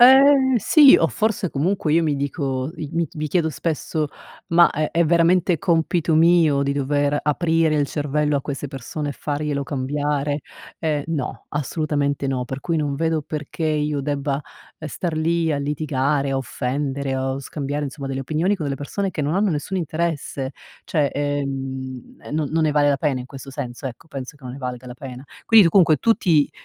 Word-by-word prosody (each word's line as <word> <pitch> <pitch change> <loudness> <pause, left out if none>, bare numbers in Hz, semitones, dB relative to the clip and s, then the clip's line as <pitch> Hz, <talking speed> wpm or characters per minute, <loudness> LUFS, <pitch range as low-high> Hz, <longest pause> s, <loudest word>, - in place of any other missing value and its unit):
Ehm, 265 +1 +7
sì, 275 - +7
o 165 - +3
forse 215 +1 -1
comunque 155 +1 0
io 165 - +4
mi 150 -3 +1
dico, 140 -1 -2
mi 165 +1 -2
mi 155 0 -3
chiedo 165 0 +1
spesso: 155 -1 -2 0.4
"Ma 170 +1 +6
è 155 +1 -1
è 170 +1 +2
veramente 170 +2 +3
compito 165 0 +1
mio 160 -4 +4
di 140 - 0
dover 145 +1 +1
aprire 160 +1 +2
il 145 -1 +2
cervello 150 +1 0
a - - 0
queste 140 0 -5
persone 140 +3 -5
e - - -4
farglielo 145 0 -2
cambiare?" 145 +1 -1 0.4
Ehm, 150 -3 0
no, 155 -6 -4
assolutamente 145 -1 -1
no, 130 -2 -1
per 135 +2 -5
cui 165 +4 -2
non 145 -3 -1
vedo 160 0 0
perché 150 +2 -5
io 150 -1 0
debba, 140 0 -1 0.4
ehm, 155 - -6
star 165 +2 -3
lì 165 0 +1
a 145 - 0
litigare, 140 -1 0
a - - 0
offendere 135 +1 -2
o 130 0 -2
scambiare 145 +1 -4
insomma 140 0 -6
delle 135 0 -3
opinioni 160 +9 0
con 165 - -4
delle 140 -1 -2
persone 190 +8 -3
che 155 - -2
non 145 +3 0
hanno 200 0 +2
nessun 160 +5 -2
interesse. 155 -5 -2 0.3
Cioè, 150 -3 +1
ehm, 135 -3 -4
e - - -11
non 150 -1 0
non 160 0 +2
ne 155 - +2
vale 145 -1 +3
la 140 - +3
pena 135 -2 0
in 125 - -8
questo 135 0 -10
senso 125 +1 -5
ecco, 130 +5 -9
penso 135 -2 -7
che 145 - -27
non 125 -1 -7
ne - - -9
valga 125 -1 -5
la 125 - -8
pena. 125 0 -9 0.2
Quindi 220 -5 +7
tu - - +3
comunque 165 -4 +5
tu 225 - +3
ti 155 -8 +2
150 Hz, 190 wpm, -22 LUFS, 140-165 Hz, 0.4 s, Ehm